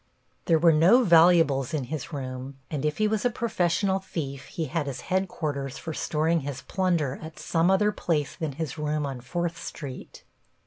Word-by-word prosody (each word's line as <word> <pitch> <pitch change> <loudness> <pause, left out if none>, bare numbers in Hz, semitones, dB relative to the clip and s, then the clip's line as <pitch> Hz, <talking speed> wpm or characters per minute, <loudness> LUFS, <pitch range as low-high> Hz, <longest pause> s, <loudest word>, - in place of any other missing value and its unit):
There 165 - +4
were 165 +1 +5
no 185 +12 +6
valuables 165 - +5
in 145 - -1
his 155 +4 -5
room, 130 -1 -6
and 150 -3 -2
if 150 0 0
he 215 - +2
was 215 -1 0
a 245 - +3
professional 195 -4 0
thief 140 -7 -5
he 165 - -3
had 155 0 -2
his 135 -2 -5
headquarters 150 -8 -2
for 160 - -6
storing 160 +2 +1
his 140 -2 -6
plunder 170 -8 0
at 160 0 -9
some 165 +1 +1
other 210 +2 +3
place 155 -8 -1
than 155 -4 -3
his 155 0 -5
room 150 0 -1
on 135 -3 -5
Fourth 170 +6 -3
Street. 135 -4 -8
160 Hz, 180 wpm, -26 LUFS, 140-175 Hz, -, no